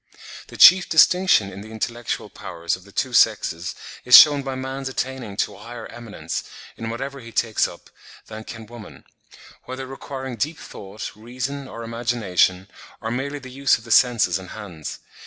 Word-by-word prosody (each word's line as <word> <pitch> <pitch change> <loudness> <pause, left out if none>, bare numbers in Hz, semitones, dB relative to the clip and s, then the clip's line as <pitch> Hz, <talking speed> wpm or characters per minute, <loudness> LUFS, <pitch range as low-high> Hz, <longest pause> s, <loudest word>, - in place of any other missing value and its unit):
The - - -11
chief 185 -1 +8
distinction 160 - +4
in 100 - -9
the 110 - -11
intellectual 115 +2 -4
powers 85 0 -4
of 95 - -16
the 100 - -16
two 130 +5 -2
sexes 90 -7 +2 0.3
is 125 - +10
shewn 145 -2 +8
by 135 -1 -5
man's 130 +1 -5
attaining 130 -6 -4
to - - -1
a - - -14
higher 115 +1 -9
eminence, 115 -3 -6 0.3
in 115 0 -6
whatever 135 +4 -5
he 115 -2 -11
takes 110 -1 +1
up, - - -14 0.3
than 110 0 -9
can 115 -1 -9
woman—whether 120 +3 -12
requiring 130 -1 -7
deep 150 +7 -2
thought, 100 +2 -9
reason, 130 +5 -5
or 115 -2 -8
imagination, 115 -6 0 0.3
or 110 - -4
merely 140 +4 -3
the 130 -2 -11
use 140 +2 +2
of 110 - -15
the 115 - -9
senses 120 -5 +4
and 95 - -11
hands. 90 -8 -8
120 Hz, 170 wpm, -22 LUFS, 110-130 Hz, 0.3 s, is